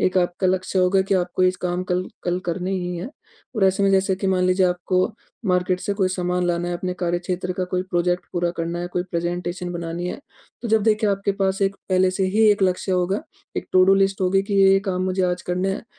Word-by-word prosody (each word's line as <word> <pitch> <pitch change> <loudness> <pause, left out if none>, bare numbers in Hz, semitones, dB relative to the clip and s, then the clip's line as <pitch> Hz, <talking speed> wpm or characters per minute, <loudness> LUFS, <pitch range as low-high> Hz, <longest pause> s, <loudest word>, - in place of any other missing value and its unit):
एक 185 0 +2
आपका 180 +1 0
लक्ष्य 185 +1 0
होगा 185 +1 +3
कि 195 +1 0
आपको 180 0 0
इस 185 0 +3
काम 180 0 -2
कल 180 +1 -1 0.2
कल 175 0 0
करने 180 +2 -2
ही 180 -1 -2
हैं। 185 +10 -6 0.5
और 200 - +3
ऐसे 190 +1 +2
में 195 - +4
जैसे 190 0 +3
कि 195 - -3
मान 185 -1 +2
लीजिए 185 0 +3
आपको 180 +1 +1 0.4
मार्केट 180 0 +1
से 200 - -2
कोई 190 -2 +1
सामान 180 -1 -1
लाना 175 0 -1
है, 175 - -2
अपने 180 +1 -3
कार्यक्षेत्र 180 +1 -2
का 185 0 -2
कोई 180 0 +1
प्रोजेक्ट 175 0 0
पूरा 175 -1 0
करना 170 +1 -2
है, 175 - -3
कोई 180 0 -2
प्रेजेंटेशन 175 +1 -3
बनानी 170 +1 -4
है। 285 - -6 0.4
तो 235 - -3
जब 220 -1 +3
देखिए 215 -1 +2
आपके 200 0 0
पास 195 0 0
एक, 195 0 +1
पहले 185 0 +3
से 190 +1 -1
ही 220 0 +5
एक 205 -1 +1
लक्ष्य 185 +1 +1
होगा, 180 +3 0 0.3
एक - - -3
टू-डू 185 +1 +6
लिस्ट 195 0 +1
होगी 190 +1 +2
कि 200 0 -3
ये-ये 195 0 +5
काम 185 -1 -1
मुझे 185 0 0
आज 180 0 0
करने 180 +2 -1
हैं। 205 - -6
185 Hz, 235 wpm, -22 LUFS, 180-195 Hz, 0.5 s, टू-डू